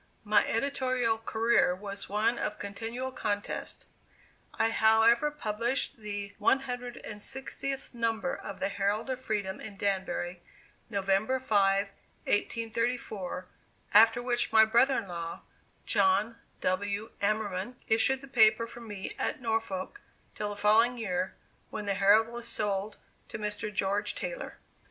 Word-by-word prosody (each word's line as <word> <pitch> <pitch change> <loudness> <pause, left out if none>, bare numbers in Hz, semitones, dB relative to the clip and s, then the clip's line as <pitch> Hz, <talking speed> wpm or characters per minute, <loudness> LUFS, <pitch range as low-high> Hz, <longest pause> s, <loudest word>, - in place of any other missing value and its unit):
My 210 -1 +4
editorial 255 -2 0
career 225 -4 +2
was 200 +1 -6
one 220 +4 +1
of 210 - -2
continual 230 +6 -4
contest. 205 -5 -3 0.7
I 225 - +2
however 225 +5 +5
published 240 -2 -1
the 205 -2 -5
160th 255 +2 -2
number 230 +2 -1
of 200 - -8
The - - 0
Herald 205 +5 -1
of 255 0 -4
Freedom 205 -5 -2
in 205 -2 -8
Danbury, 185 -3 -2 0.5
November 200 +5 +1
5, 200 -4 +2 0.4
1834, 225 -4 -1 0.5
after 225 +3 +6
which 240 -1 0
my 220 0 +7
brother 240 +5 +4
in 215 - -3
law, 170 -2 -5 0.4
John 205 +2 +2 0.2
W. 200 +3 -1
Amerman, 205 +1 -1
issued 255 +4 +2
the 275 - -11
paper 230 -3 +5
for 235 +1 -11
me 205 -4 -6
at - - -1
Norwalk 225 - -2 0.3
till 210 - -3
the 205 - -5
following 225 +4 +4
year, 185 -5 -2 0.3
when 210 -1 -5
the 200 - +1
Herald 200 +3 +5
was 235 0 -7
sold 205 -2 -2 0.3
to - - -5
Mr. 210 0 -3
George 200 +1 0
Taylor. - - -5
220 Hz, 130 wpm, -30 LUFS, 200-235 Hz, 0.7 s, my